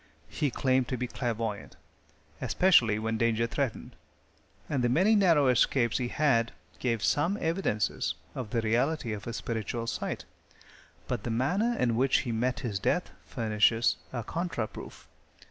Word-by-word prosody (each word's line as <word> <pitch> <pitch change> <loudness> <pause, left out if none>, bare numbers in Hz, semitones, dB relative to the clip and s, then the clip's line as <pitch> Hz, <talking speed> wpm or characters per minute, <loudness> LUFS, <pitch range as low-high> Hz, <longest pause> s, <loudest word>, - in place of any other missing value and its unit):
He 145 - -1
claimed 130 0 +1
to 130 - -2
be 125 +1 -2
clairavoyant, 115 -4 -3 0.7
especially 120 - +4
when 110 0 -2
danger 115 0 +2
threatened, 130 0 -3 0.7
and 135 -4 -1
the 120 - +3
many 185 - +4
narrow 165 -9 +4
escapes 125 -1 +2
he 125 - -1
had 120 -4 +2 0.3
gave 115 -4 -1
some 170 +8 +2
evidences 160 - -1 0.2
of 125 -5 -5
the 115 +2 0
reality 120 +3 0
of 105 -1 -7
his 120 - -4
spiritual 115 0 -3
sight, - - -4 0.8
but - - -2
the 120 - -4
manner 180 - +1
in 120 -2 +1
which 130 +3 +3
he 125 - -4
met 125 +3 -1
his 110 -7 -2
death - - 0 0.2
furnishes 115 +1 +2
a 120 -3 -4
contra 170 - -2
proof. - - -11
120 Hz, 150 wpm, -29 LUFS, 115-140 Hz, 0.8 s, especially